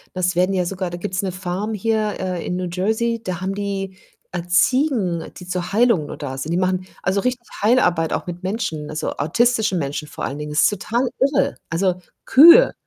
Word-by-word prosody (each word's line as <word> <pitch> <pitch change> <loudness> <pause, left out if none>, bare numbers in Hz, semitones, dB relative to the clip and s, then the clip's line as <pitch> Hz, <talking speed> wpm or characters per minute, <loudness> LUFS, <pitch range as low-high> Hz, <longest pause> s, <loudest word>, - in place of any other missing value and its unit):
ne, 185 - -3
es 180 0 +1
werden 185 +2 +2
ja 180 -2 +1
sogar 185 0 -3
da 175 - -5
gibt's 185 +2 -3
'ne 190 -2 -2
Farm 185 +4 -3
hier, 215 0 0
äh, 185 -2 -3
in 180 - -2
New 180 -1 -3
Jersey, 220 +5 0
da 180 -3 -4
haben 190 +1 -2
die, 195 -2 -4 0.4
äh, 175 -1 -3
Ziegen, 185 - +2
die 180 - -10
zur 180 0 -3
Heilung 225 -8 +3
nur - - -7
da 135 -3 -5
sind. 150 +4 -4
Die - - +1
machen 185 0 0 0.2
also 190 +2 +1
richtig 250 -1 -2 0.2
Heilarbeit 180 -8 +3
auch - - -3
mit 175 0 -7
Menschen, 165 -7 -3
also 155 0 -3
autistischen 215 - +1
Menschen 145 0 -3
vor - - -8
allen 140 - -3
Dingen. 150 0 -5
Das 150 - +3
ist - - +5
total 230 +5 -1
irre. 275 +1 +2
Also, 180 +2 +1 0.3
Kühe 335 - +8
185 Hz, 210 wpm, -21 LUFS, 175-220 Hz, 0.4 s, Kühe